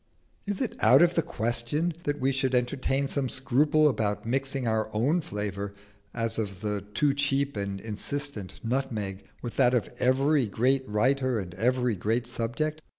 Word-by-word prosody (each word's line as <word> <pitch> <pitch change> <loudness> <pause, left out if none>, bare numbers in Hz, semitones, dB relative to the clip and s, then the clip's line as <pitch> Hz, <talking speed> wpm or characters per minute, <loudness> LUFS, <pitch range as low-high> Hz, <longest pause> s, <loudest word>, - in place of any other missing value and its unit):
Is 205 -1 -2
it 250 - -1
out 135 +6 +7
of 175 0 +4
the 170 - +3
question 145 +3 -1
that 145 0 -1
we 135 +1 +2
should 130 -1 0
entertain 135 +2 +1
some 135 -2 -1
scruple 145 +4 +3
about 110 -7 0
mixing 135 +1 -1
our 110 -1 0
own 145 +11 +2
flavour, 100 - -4 0.4
as 115 -1 -2
of 100 -3 -4
the 105 -2 -2
too 145 +3 +3
cheap 140 0 0
and 100 -1 -3
insistent 110 +1 -4
nutmeg, 110 -6 -2 0.2
with 120 - -5
that 125 -2 +4
of 120 0 -1
every 135 +1 +3
great 130 +5 +1
writer 130 +4 +2
and 90 -4 -5
every 125 +3 +1
great 115 +5 0
subject? 120 +7 -2
125 Hz, 160 wpm, -28 LUFS, 110-140 Hz, 0.4 s, out